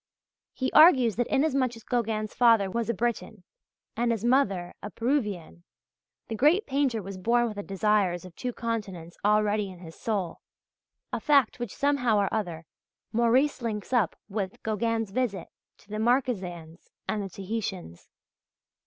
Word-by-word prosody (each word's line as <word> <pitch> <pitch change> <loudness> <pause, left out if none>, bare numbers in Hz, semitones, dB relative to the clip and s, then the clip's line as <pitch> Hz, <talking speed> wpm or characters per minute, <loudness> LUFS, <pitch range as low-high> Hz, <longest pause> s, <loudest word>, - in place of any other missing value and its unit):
He 260 -1 -1
argues 265 - +6
that 245 - +1
inasmuch 270 -4 +1
as 225 - -13
Gauguin's 220 -3 -1
father 225 -5 +4
was 230 +2 -2
a - - +2
Breton 220 -3 -3 0.5
and 235 +1 +1
his 225 -1 -2
mother 200 -9 +2
a 210 - -6
Péruvienne, 210 - -2 0.7
the - - -5
great 305 - +3
painter 265 -6 0
was 195 0 -7
born 240 +5 +2
with 220 -3 -4
the - - -2
desires 195 -3 0
of 180 -2 -12
two 250 - -3
continents 205 -8 -5
already 210 0 +2
in 185 - -11
his 165 -2 -11
soul 200 -7 -3 0.7
a - - 0
fact 280 -6 +3
which 240 -4 -5
somehow 275 -6 +2
or 200 -1 +1
other 175 -7 -3 0.5
Morice 245 +5 +2
links 220 0 -4
up 230 -8 +2
with 195 -2 -4
Gauguin's 225 0 -1
visit 205 -6 -2 0.3
to - - -24
the 215 +1 -4
Marquesans 190 -9 -1 0.2
and 215 - -1
the 195 - -5
Tahitans. 190 - -5
220 Hz, 155 wpm, -27 LUFS, 195-240 Hz, 0.7 s, argues